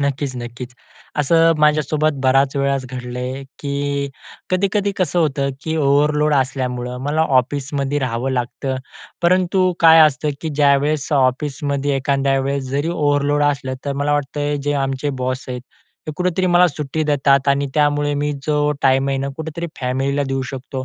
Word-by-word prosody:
नक्कीच, 140 -1 -1
नक्कीच. 120 +1 -7 0.4
असं 165 +3 +4
माझ्यासोबत 150 0 +2
बराच 135 +1 +3
वेळाच 140 -1 0
घडलं 125 -1 -6
आहे, 130 +2 -4 0.2
की 140 0 -2 0.4
कधी-कधी 200 +2 +1
कसं 180 -1 0
होतं 140 -3 +1
की 160 0 -2
ओव्हरलोड 150 +1 +2
असल्यामुळं 125 -2 -1
मला 155 +2 0 0.2
ऑफिसमध्ये 140 +2 -3
राहावं 130 0 -2
लागतं. 130 +1 -2 0.5
परंतु 185 +1 +3
काय 165 -1 +8
असतं 150 -1 +3
की 160 - -3
ज्यावेळेस 145 0 +2
ऑफिसमध्ये 140 +1 0
एखाद्या 135 0 +1
वेळेस 135 -1 -2
जरी 145 +4 -1
ओव्हरलोड 145 -2 +1
असलं, 135 -2 -1
तर 140 - -1
मला 145 +1 0
वाटत 145 0 -2
आहे 145 0 0
जे 145 +1 -2
आमचे 135 +2 -2
बॉस 130 +1 -2
आहेत, 125 -1 -4 0.5
हे 155 - -4
कुठेतरी 180 0 0
मला 175 0 +5
सुट्टी 150 +1 -3
देतात 140 -1 +3
आणि 140 0 +2
त्यामुळे 145 -1 +2
मी 150 0 0
जो 150 -1 +1
टाईम 135 0 +3
आहे 135 -1 0
ना 135 +1 -2
कुठेतरी 160 +2 -5
फॅमिलीला 135 +3 0
देऊ 135 0 -1
शकतो. 130 0 -5
140 Hz, 155 wpm, -19 LUFS, 135-150 Hz, 0.5 s, काय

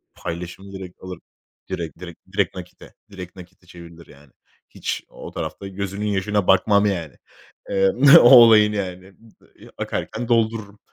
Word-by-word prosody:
paylaşımı 90 +3 -8
direkt 95 -2 -11
alır. 90 -2 -8 0.5
Direkt 80 -3 -6
direkt 85 -2 -11
direkt - - -1
nakite - - -12 0.2
direkt 90 -2 -10
nakite 90 0 -15
çevirilir 85 -1 -14
yani. 70 -1 -19 0.4
Hiç - - -5
o - - -11
tarafta 100 - -6
gözünün 100 +1 -5
yaşına 100 0 -1
bakmam 100 -1 +3
yani. 85 -8 -3 0.5
Eee, 95 0 +2 0.3
o 120 - +6
olayın 110 -4 +7
yani. 95 -1 -6 0.5
I - - -15
ı - - -17
akarken 120 - -5
doldururum. 110 -3 -1
95 Hz, 145 wpm, -21 LUFS, 90-105 Hz, 0.5 s, olayın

